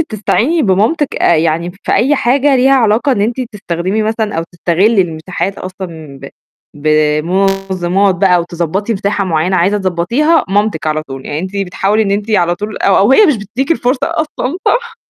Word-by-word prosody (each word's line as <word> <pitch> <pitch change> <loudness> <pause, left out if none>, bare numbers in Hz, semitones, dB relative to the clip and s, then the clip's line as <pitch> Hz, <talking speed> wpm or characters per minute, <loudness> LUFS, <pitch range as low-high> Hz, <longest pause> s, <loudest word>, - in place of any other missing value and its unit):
بتستعيني 300 - 0
بمامتِك 225 - +1
آآ، 170 - +3
يعني 165 +2 0
في - - -2
أي 275 +6 +2
حاجة 270 +2 +2
ليها 265 +2 +3
علاقة 235 +2 +2
إن 205 - -1
أنتِ 235 +5 -1
تستخدمي 190 +1 -2
مثلًا 220 -1 -2
أو - - 0
تستغلي 190 +5 +2
المساحات 175 +3 -4
أصلًا 165 -7 -8
ب 140 - -7 0.5
بمنظمات 180 +5 +1
بقى 180 0 +3
أو 175 - +1
تضبّطي 175 +5 -3
مساحة 200 0 -1
معينة 180 +1 0
عايزة 190 +4 +2
تضبّطيها، 220 - +1
مامتِك 205 -5 0
على 155 0 -1
طول، 135 -3 -9
يعني 145 - -3
أنتِ 185 +4 -5
بتحاولي 200 +2 0
إن 195 - -2
أنتِ 205 +2 -2
على 175 -5 +2
طول 210 +4 -6
أو 195 - +2
أو 205 +7 +4
هي 420 +9 +6
مش 295 -8 +2
بتديكِ 230 - -4
الفرصة 255 -4 0
أصلًا. 315 -3 -3
صح؟ - - 0
195 Hz, 175 wpm, -14 LUFS, 175-230 Hz, 0.5 s, هي